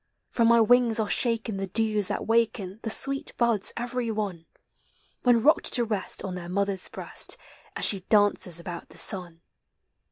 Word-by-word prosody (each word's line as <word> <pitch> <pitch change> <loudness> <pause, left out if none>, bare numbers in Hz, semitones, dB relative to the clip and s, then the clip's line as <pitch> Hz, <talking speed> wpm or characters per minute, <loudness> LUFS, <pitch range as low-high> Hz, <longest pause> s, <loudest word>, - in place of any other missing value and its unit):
From 230 -2 +2
my 235 0 +5
wings 235 0 +4
are 215 - 0
shaken 225 -2 0
the 195 0 -4
dews 215 0 +2
that - - -3
waken 220 -4 0
The 225 - -4
sweet 275 +5 -3
buds 235 -5 +1
every 240 0 -3
one, 200 -7 -4 0.7
When 240 -3 +3
rocked 305 - +3
to 245 - +4
rest 210 -4 -3
on 190 - -5
their 175 -1 -7
mothers 195 0 -1
breast, - - -2 0.4
As - - +2
she 200 - +3
dances 200 -3 +2
about 170 0 -8
the - - -14
sun. 175 -4 +1
215 Hz, 165 wpm, -26 LUFS, 190-235 Hz, 0.7 s, my